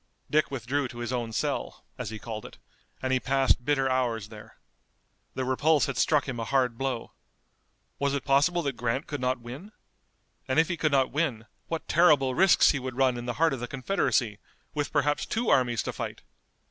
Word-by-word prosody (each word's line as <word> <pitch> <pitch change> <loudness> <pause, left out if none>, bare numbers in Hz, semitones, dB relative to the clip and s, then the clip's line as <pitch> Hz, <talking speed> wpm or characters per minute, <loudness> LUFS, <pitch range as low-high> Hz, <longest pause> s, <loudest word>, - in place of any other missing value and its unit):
Dick 155 +1 +3
withdrew 135 +2 -2
to 120 - -11
his 120 +1 -3
own 120 -2 -2
cell, - - -3
as - - -5
he 110 - -6
called 110 -1 -6
it, - - -11 0.5
and 130 0 0
he 130 - +3
passed 135 -1 +2
bitter 135 0 +1
hours 120 -5 0
there. 105 -1 -13 0.8
The 130 - -2
repulse 145 +4 +3
had 140 -3 -3
struck 150 -3 +2
him 125 -3 -4
a - - -2
hard 125 -1 +1
blow. 130 -1 -3 0.9
Was 140 0 +1
it 140 - -4
possible 150 +5 +3
that 140 -3 -2
Grant 120 +4 -1
could 145 -3 -5
not 125 0 0
win? 130 - -9 0.8
And 130 - 0
if 160 0 +4
he 175 - 0
could 155 -2 0
not 135 -2 +2
win 135 -7 -1 0.2
what 165 -1 -4
terrible 150 -6 +4
risks 190 +5 +5
he 140 - -2
would 130 -1 -6
run 130 -2 +3
in 120 0 -6
the 120 - -1
heart 165 +1 +2
of 135 - -4
the 120 - -4
Confederacy, 125 - 0 0.3
with 145 -2 -2
perhaps 145 0 +1
two 230 +1 -1
armies 120 -4 +2
to - - -4
fight! - - -6
130 Hz, 200 wpm, -27 LUFS, 120-145 Hz, 0.9 s, risks